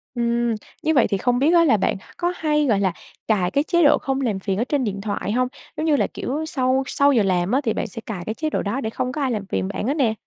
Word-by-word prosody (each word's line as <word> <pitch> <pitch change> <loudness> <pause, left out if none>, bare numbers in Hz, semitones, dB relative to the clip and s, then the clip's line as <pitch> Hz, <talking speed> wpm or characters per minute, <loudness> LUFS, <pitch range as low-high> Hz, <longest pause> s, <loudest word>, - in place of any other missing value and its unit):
Ừm. 235 -1 +1 0.3
Như 315 - +2
vậy 260 -6 +4
thì 200 - 0
không 245 +4 +1
biết 300 +6 +3
á 340 -1 +6
là 255 -8 +4
bạn 195 - 0 0.2
có 350 0 0
hay, 300 -1 +1
gọi 220 -7 +2
là, 190 -2 +2 0.4
cài 190 -5 +1
cái 280 - +2
chế 345 +1 +2
độ 290 0 +6
không 270 0 -2
làm 220 -7 -1
phiền 190 0 -2
ở 225 - +1
trên 275 +1 0
điện 200 -3 -3
thoại 205 0 -3
hông? 250 +3 +1 0.3
Giống 310 - -1
như 310 -2 +3
là, - - +1
kiểu, 300 +5 -4
sau 265 -3 +1
sau 280 0 +3
giờ 235 -6 +3
làm 185 -1 +1
á, 265 +3 +2
thì 225 - 0
bạn - - -2
sẽ 230 - -8
cài 195 -6 -5
cái 215 - -2
chế 310 +4 -2
độ - - -1
đó 225 +7 -2
để 220 - -2
không 250 +3 -3
có 300 +3 -4
ai 265 -2 +1
làm 210 -4 -3
phiền 95 - -2
bạn 210 - -3
hết 275 - +2
nè. 240 -7 +2
245 Hz, 300 wpm, -22 LUFS, 210-285 Hz, 0.4 s, á